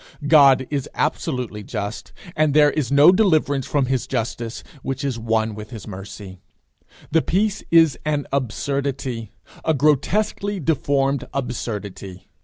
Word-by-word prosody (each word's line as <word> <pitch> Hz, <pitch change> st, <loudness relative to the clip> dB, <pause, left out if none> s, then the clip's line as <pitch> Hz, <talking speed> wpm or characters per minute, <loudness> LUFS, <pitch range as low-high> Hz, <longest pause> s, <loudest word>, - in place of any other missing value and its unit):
God 140 Hz, -4 st, +6 dB
is 140 Hz, -3 st, -2 dB
absolutely 125 Hz, -8 st, -2 dB
just, 105 Hz, +1 st, -5 dB, 0.2 s
and 155 Hz, -2 st, +2 dB
there 150 Hz, -1 st, +6 dB
is 140 Hz, -5 st, -2 dB
no 145 Hz, +5 st, +7 dB
deliverance 155 Hz, -, +2 dB
from 140 Hz, -3 st, +1 dB
his 130 Hz, -1 st, -1 dB
justice, 115 Hz, +1 st, -3 dB, 0.2 s
which 135 Hz, 0 st, -4 dB
is 130 Hz, -4 st, -2 dB
one 110 Hz, -1 st, 0 dB
with 105 Hz, 0 st, -9 dB
his 110 Hz, -6 st, -9 dB
mercy. 95 Hz, -1 st, -9 dB, 0.7 s
The 165 Hz, +1 st, +4 dB
device 205 Hz, +5 st, 0 dB
is 165 Hz, -5 st, +5 dB
an 150 Hz, -2 st, -1 dB
absurdity 135 Hz, -2 st, -2 dB, 0.3 s
a 160 Hz, -, +1 dB
grotesquely 190 Hz, +8 st, +1 dB
deformed 140 Hz, -4 st, 0 dB
absurdity. 105 Hz, -7 st, -5 dB
135 Hz, 130 wpm, -22 LUFS, 115-150 Hz, 0.7 s, no